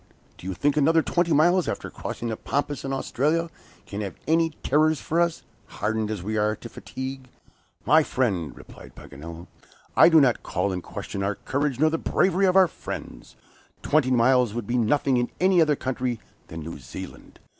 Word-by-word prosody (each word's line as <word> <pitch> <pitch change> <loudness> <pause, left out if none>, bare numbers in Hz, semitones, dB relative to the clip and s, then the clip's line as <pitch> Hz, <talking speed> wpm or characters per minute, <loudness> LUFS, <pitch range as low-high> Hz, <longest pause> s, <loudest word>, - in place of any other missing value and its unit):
do 90 - -9
you 95 - -3
think 145 +7 +1
another 160 +2 +4
twenty 175 -1 0
miles 175 +4 +4
after - - -4
crossing 120 - -5
the 110 - -2
Pampas 145 +4 -3
and 135 - -3
Australia, 155 +5 0 0.3
can 100 +1 -5
have 100 -2 -5
any 165 +1 +3
terrors 155 +2 +3
for 165 +2 0
us, 170 -1 0 0.2
hardened 110 0 -2
as 105 -5 -4
we 110 +3 -2
are 105 0 +1
to 115 - -10
fatigue?" 130 +2 -7 0.6
"My 160 +1 +6
friend," 100 - -1
replied - - -14
Paganel, 80 +4 -10 0.5
"I - - +8
do 165 -2 +7
not 130 -5 +3
call 95 +2 -1
in 90 -1 -3
question 100 - -6
our 100 +1 -1
courage 140 +1 -2
nor 155 +1 +4
the 165 - -1
bravery 190 +1 +2
of 185 - +2
our 190 -1 +7
friends. - - -8 0.5
Twenty 150 -4 +2
miles 125 -2 +3
would 120 -3 -3
be 120 - -2
nothing 130 +3 +2
in 120 0 0
any 185 -1 +4
other 150 -2 +3
country 125 -3 -3 0.3
than 80 0 -7
New 80 +2 -7
Zealand. - - -10
130 Hz, 185 wpm, -25 LUFS, 110-155 Hz, 0.6 s, I